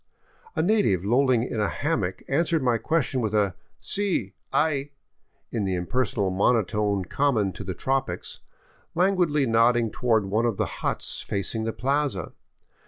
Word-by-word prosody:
A - - +1
native 145 - +2
lolling 125 +1 +3
in 120 -2 -3
a 105 - +2
hammock 105 - -2
an 140 - +1
swered 165 -2 0
my 120 -3 +2
question 145 -4 0
with 110 -2 -1
a 100 -3 +2 0.2
" - - -44
si, 185 - 0 0.2
hay 145 -2 0 0.3
" - - -45
in 110 - -1
the 95 -1 0
impersonal 100 +1 -1
monotone 100 -1 +1
common 115 -3 +1
to - - -7
the 95 -2 -5
tropics, 135 0 -2 0.6
languidly 175 -5 +2
nodding 115 -1 +3
toward 115 -4 +1
one 110 +5 +1
of 110 -4 -1
the - - +1 0.2
huts - - -1
facing 105 +3 -2
the 115 - -1
plaza. 135 - -1
115 Hz, 160 wpm, -25 LUFS, 100-140 Hz, 0.6 s, lolling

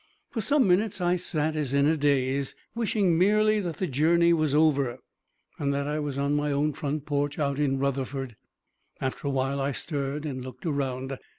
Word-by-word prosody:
] - - -46
For 225 - -2
some 285 +1 +3
minutes 190 +2 +2
I 175 0 +2
sat 155 -3 -1
as 140 -3 -1
in 140 0 +4
a 160 +2 +3
daze, 140 -2 +1 0.2
wishing 205 -7 +1
merely 215 +3 +4
that 175 -6 -4
the 190 - -1
journey 170 +4 +3
was 155 -3 +1
over, 140 -5 +3 0.6
and 140 -1 0
that 140 0 -1
I 150 +1 -1
was 145 -2 -3
on 140 +1 0
my 145 0 0
own 145 +2 +1
front 145 0 -3
porch 145 0 -1
out 140 -2 -1
in 135 -2 +1
Rutherford. 135 -2 -2 0.6
After 135 +1 -3
awhile 135 0 0
I 140 +1 0
stirred 145 0 -3
and 130 -4 -4
looked 130 +2 -10
around. 135 -3 -2
145 Hz, 190 wpm, -27 LUFS, 140-165 Hz, 0.6 s, in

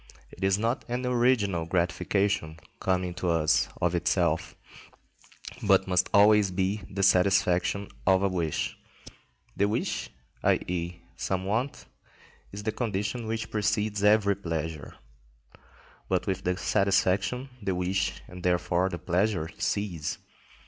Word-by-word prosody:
It 95 - -9
is 95 0 +3
not 115 +5 -1
an 125 +1 -2
original 120 -9 +2
gratification 90 0 0 0.2
coming 90 -1 0
to 90 0 -2
us 80 -2 +2
of 85 -1 +1
itself, 85 -2 0 1.1
but 95 -2 +3
must 90 -1 +2
always 105 0 +6
be 95 +3 -1
the 100 0 -2
satisfaction 95 +1 +3 0.2
of 95 0 +4
a - - +4
wish. 85 -5 -2 0.8
The 100 - +2
wish, 65 - -2 0.3
i.e., 85 0 -1
some 95 -1 -2
want, 115 +8 -2 0.7
is 100 +1 -7
the 110 - 0
condition 110 +1 -2
which 110 0 -3
precedes 105 -1 0
every 105 -1 +4
pleasure. 80 -5 -5 1.1
But - - +1
with 95 0 -2
the 90 0 0
satisfaction 100 +7 +1
the 95 -2 -1
wish 90 +2 -1
and 90 0 -10
therefore 90 +1 +1
the 85 - -4
pleasure 90 -2 0
cease. 90 -7 -2
95 Hz, 125 wpm, -28 LUFS, 90-105 Hz, 1.1 s, always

